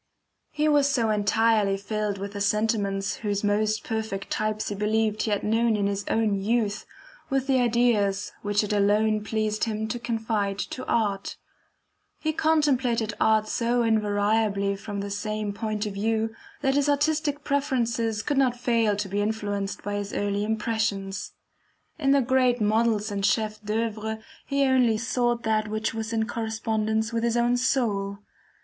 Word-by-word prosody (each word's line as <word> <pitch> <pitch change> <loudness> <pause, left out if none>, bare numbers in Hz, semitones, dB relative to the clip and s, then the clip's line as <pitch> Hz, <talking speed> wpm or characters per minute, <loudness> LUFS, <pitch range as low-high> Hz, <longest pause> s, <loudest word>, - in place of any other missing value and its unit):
He 300 0 0
was 290 -2 +4
so 235 -6 +1
entirely 210 -1 +2
filled 210 0 -2
with 200 +1 -6
the 200 - -5
sentiments 205 -2 0
whose 205 -2 -2
most 210 +1 +1
perfect 220 -3 -4
types 215 0 -1
he - - -2
believed 215 +1 0
he 220 - -1
had 205 -1 0
known 225 +1 +2
in 200 - 0
his 200 0 -1
own 210 -3 +1
youth, 215 0 0 0.4
with 270 -1 0
the 265 -1 +2
ideas 230 -5 +2
which 205 +1 +1
it 210 - -2
alone 210 +1 +2
pleased 215 0 -1
him 220 -1 -2
to 240 - -3
confide 220 -4 -1
to 255 +5 -4
art; 205 -4 -1 0.8
he 315 0 -1
contemplated 260 -9 +1
art 215 -1 +3
so 235 +1 +1
invariably 205 -2 +1
from 200 0 -5
the 200 0 -5
same 210 0 -3
point 215 0 -3
of 210 - -4
view, 220 +2 0 0.3
that 270 - +2
his 285 +1 +2
artistic 290 0 +1
preferences 235 -6 0
could 285 -2 0
not 250 -3 +2
fail 230 -4 +2
to 205 0 -3
be 200 +2 -1
influenced 205 -2 -2
by 205 - -3
his 205 0 -5
early 205 0 -1
impressions. 215 -3 -2 0.7
In 275 -3 +1
the 280 0 +5
great 255 -1 +2
models 215 0 +1
and 200 -1 -3
CHEFS 215 +1 +1
D'OEUVRE, 220 0 -2 0.3
he 280 0 +1
only 250 -4 +3
sought 240 +1 0
that 215 -1 +1
which 215 +1 -2
was 225 0 -4
in 220 -1 0
correspondence 220 -1 -1
with 230 0 0
his 235 0 +1
own 240 +1 +3
soul. 210 -6 0
220 Hz, 160 wpm, -26 LUFS, 205-235 Hz, 0.8 s, the